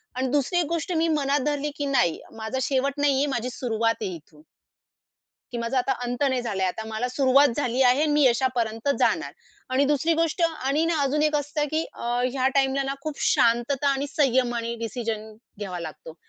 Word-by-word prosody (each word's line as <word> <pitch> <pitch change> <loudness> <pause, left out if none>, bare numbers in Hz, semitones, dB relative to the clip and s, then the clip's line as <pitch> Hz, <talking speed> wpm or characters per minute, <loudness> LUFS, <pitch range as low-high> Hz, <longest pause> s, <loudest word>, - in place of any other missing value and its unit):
आणि 260 +1 -1
दुसरी 290 +5 +1
एक 340 - +1
गोष्ट 335 +1 -2
मी 330 +1 +2
मनात 290 -2 +1
धरली, 295 0 -1
की 290 - -3
"नाही, 245 - +1 0.2
माझा 220 +4 -3
शेवट 275 +1 0
नाहीये, 280 0 +3
माझी 245 +2 -2
सुरुवात 230 -2 0
आहे 190 -4 -3
इथून." 150 -1 -16 1.1
की 240 - -4
माझा 235 +3 -1
आता 255 +2 +1
अंत 245 +3 -2
नाही 260 -1 0
झालाय, 195 -5 -1
आता 220 +4 -4
मला 220 +3 -2
सुरुवात 275 +2 +4
झाली 255 -2 0
आहे 255 +3 +4
आणि 305 -1 +2
मी 295 -1 +4
यशापर्यंत 240 -1 +1
जाणार. - - +1 0.4
आणि 265 +2 +2
दुसरी 295 +3 +2
गोष्ट 330 +1 0
आणि 305 -1 -1
ना 330 -2 0
अजून 285 +2 +1
एक 305 0 +2
असतं 295 +1 -1
की 320 +1 0
अ, - - -9 0.3
ह्या 260 -1 +1
टाईमला 270 0 +2
ना 270 0 -2
खूप 310 -1 -5
शांतता 240 +4 +2
आणि 275 +1 -1
संयमानं 240 -4 +1
डिसिजन 220 -1 -4 0.3
घ्यावा 185 -3 -5
लागतो. 160 -1 -8
265 Hz, 190 wpm, -25 LUFS, 235-290 Hz, 1.1 s, सुरुवात